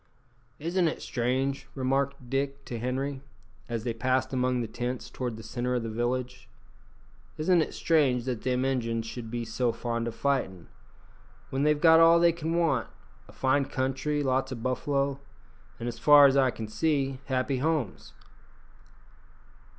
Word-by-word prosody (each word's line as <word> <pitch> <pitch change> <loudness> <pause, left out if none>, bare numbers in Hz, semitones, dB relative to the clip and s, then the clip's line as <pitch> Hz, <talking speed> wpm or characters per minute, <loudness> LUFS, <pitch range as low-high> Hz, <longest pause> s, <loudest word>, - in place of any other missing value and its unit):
"Isn't 170 +3 0
it 160 - -2
strange," 130 +3 -1
remarked 135 0 -1
Dick 140 +2 -2
to 120 - -5
Henri, 130 +3 -2 0.5
as 115 -2 -3
they 120 -1 -2
passed 130 +4 0
among 125 -1 +1
the 115 - -3
tents 120 +3 -4
towards 125 -3 -4
the 110 - -10
centre 125 +3 -2
of 120 - -1
the 115 - -4
village 125 +2 -3 0.9
"isn't 170 +2 +3
it - - -2
strange 135 -7 +2
that 125 -4 -3
them 125 +1 0
Injuns 115 -4 -1
should 115 0 -7
be 120 0 -3
so 120 +1 0
fond 115 0 -3
o' - - -2
fightin', 115 -9 -2 0.8
when 135 - -1
they've 150 0 +3
got 160 0 +7
all 165 +1 +7
they 170 0 +5
can 165 0 -3
want 170 -2 +1 0.4
a - - -14
fine 135 +1 +1
country, 135 +3 -1
lots 130 0 0
o' - - -3
buffalo, 140 +3 -1 0.6
an', 115 - -5
as 115 -1 -5
far 145 +2 +8
as 135 -1 +5
I 135 -2 +4
can 115 -2 -5
see, 135 +3 0
happy 130 0 0
homes?" 145 - -2
130 Hz, 160 wpm, -28 LUFS, 120-140 Hz, 0.9 s, far